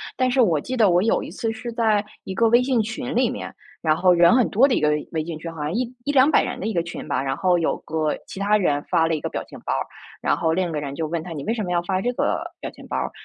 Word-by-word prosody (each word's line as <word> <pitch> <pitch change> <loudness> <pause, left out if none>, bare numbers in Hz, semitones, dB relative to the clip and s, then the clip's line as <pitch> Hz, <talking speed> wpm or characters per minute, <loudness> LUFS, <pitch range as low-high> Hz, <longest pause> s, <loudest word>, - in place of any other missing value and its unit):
但 255 0 +1
是 265 - +1
我 165 -9 +3
记 255 0 -4
得 215 -4 +5
我 175 0 +4
有 225 - +2
一 - - -7
次 225 - -3
是 235 +2 -6
在 215 -3 +2 0.2
一 190 - -5
个 230 +4 +3
微 240 +2 +5
信 250 -3 +2
群 220 +4 -4
里 245 0 +2
面， - - -6 0.3
然 155 -1 +2
后 180 -1 +5
人 175 +6 +6
很 250 - +4
多 235 +6 +5
的 255 - +1
一 - - +1
个 150 - +2
微 150 0 -1
微 160 -2 -2
信 165 -2 -5
群， 165 +1 -7
好 160 -2 -8
像 150 +4 -2
1 245 +1 -1
100-200 285 +1 +4
人 - - -4
的 - - -3
一 220 - -2
个 170 - +1
群 170 - -7
吧。 - - 0
然 135 0 -1
后 180 0 +2
有 165 - +1
个 155 -1 -1
其 - - -8
他 205 +1 +2
人 145 -7 +1
发 165 - +3
了 165 - 0
一 155 - -3
个 - - -2
表 - - -4
情 - - -12
包 - - 0
儿， - - -1 0.4
然 - - +1
后 160 -1 +1
另 180 0 0
一 - - -5
个 150 - -2
人 140 -1 -5
就 160 -2 -2
问 165 0 -2
他： 180 - -8
“你 140 -3 -6
为 225 - -1
什 225 - -3
么 180 - -3
要 175 -1 +2
发 185 +1 -1
这 245 +5 -1
个 - - 0 0.2
表 - - -4
情 - - -14
包 - - -4
儿？” - - -2
185 Hz, 335 characters per minute, -23 LUFS, 160-230 Hz, 0.4 s, 人